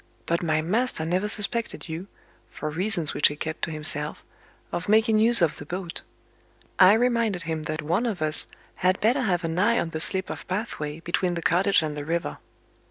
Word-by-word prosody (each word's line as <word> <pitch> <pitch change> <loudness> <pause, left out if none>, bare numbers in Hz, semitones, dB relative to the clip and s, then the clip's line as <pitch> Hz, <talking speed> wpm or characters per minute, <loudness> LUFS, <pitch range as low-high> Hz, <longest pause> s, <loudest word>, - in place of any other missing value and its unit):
But 170 0 -1
my 155 -2 0
master 210 -1 -1
never 180 +5 -1
suspected 220 +1 +3
you 165 +4 -6 0.4
(for 155 - -6
reasons 175 -1 0
which - - +4
he 145 - -5
kept 160 +1 -6
to - - -1
himself) 150 -1 -2 0.5
of 175 - -4
making 220 0 +3
use 230 -3 +6
of 160 - +1
the - - -8
boat. 175 0 -6 0.8
I 185 +1 +8
reminded 230 -5 +1
him 160 -1 -3
that 155 0 -3
one 175 +11 0
of 205 -6 -3
us 155 -1 +4 0.3
had 185 +1 +1
better 245 +6 +2
have 185 -7 0
an 165 +1 -2
eye 235 +5 +3
on 165 - -2
the 155 - -4
slip 190 +3 -2
of - - -8
pathway, 165 -6 -4
between 175 +1 -1
the 170 - -5
cottage 190 0 +2
and 150 -1 -4
the 145 - -5
river. 165 +3 -3
175 Hz, 195 wpm, -25 LUFS, 160-210 Hz, 0.8 s, I